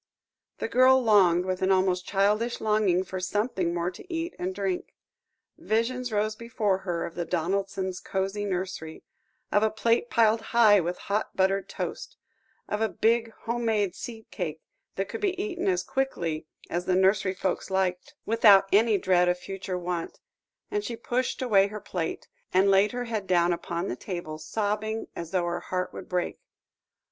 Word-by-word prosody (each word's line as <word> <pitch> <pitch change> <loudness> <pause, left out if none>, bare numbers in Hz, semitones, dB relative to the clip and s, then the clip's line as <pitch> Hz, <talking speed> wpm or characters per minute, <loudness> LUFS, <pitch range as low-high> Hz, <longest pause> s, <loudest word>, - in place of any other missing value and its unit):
The - - -2
girl 255 +2 +5
longed, 190 -7 +4
with 185 -1 -2
an 190 +1 +2
almost 185 -1 +2
childish 210 +4 +1
longing, 210 -4 +2
for 190 0 -5
something 190 -1 -1
more 175 +1 -1
to 355 - -13
eat 335 +1 -2
and 185 +1 -3
drink. 195 -3 -3 0.6
Visions 240 +3 -1
rose 215 0 0
before 215 -4 -1
her 175 -3 -2
of 170 - -7
the 175 - -3
Donaldsons' 190 +2 -2
cosy 195 +2 -2
nursery, 185 -4 -4 0.5
of 205 - +4
a 220 - +3
plate 230 +2 +1
piled 225 -1 +3
high 220 -2 +5
with 175 0 -2
hot 205 +2 -2
buttered 195 +1 +1
toast, - - -5 0.5
of 210 - -2
a 220 - +2
big 230 +2 +1
home 235 +1 -2
made 210 -5 +1
seed 225 +1 -8
cake, 160 -5 -4 0.3
that 195 0 -2
could - - -6
be 380 -3 0
eaten 390 -2 -2
as 370 -1 +2
quickly 170 - -2 0.2
as 175 +1 -2
the 185 0 +2
nursery 190 0 +3
folks 190 +1 -2
liked, 190 +8 -1
without 205 -3 +6
any 215 +1 +5
dread 180 -1 +3
of 180 - +1
future 190 0 -5
want, 175 -1 -4 0.5
and 415 0 -1
she 235 - -4
pushed 245 +3 -2
away 200 -5 +4
her 210 +1 -7
plate, 180 -5 -4 0.2
and 190 +2 +4
laid 195 +2 +4
her 245 0 -3
head 215 -4 -3
down 175 -1 +3
upon 170 +1 -3
the - - -3
table, 155 0 -6
sobbing 215 +5 -2
as 170 -1 -6
though 180 -1 0
her 175 0 -2
heart 185 0 -3
would - - -9
break. 180 -1 -2
195 Hz, 175 wpm, -27 LUFS, 180-225 Hz, 0.6 s, without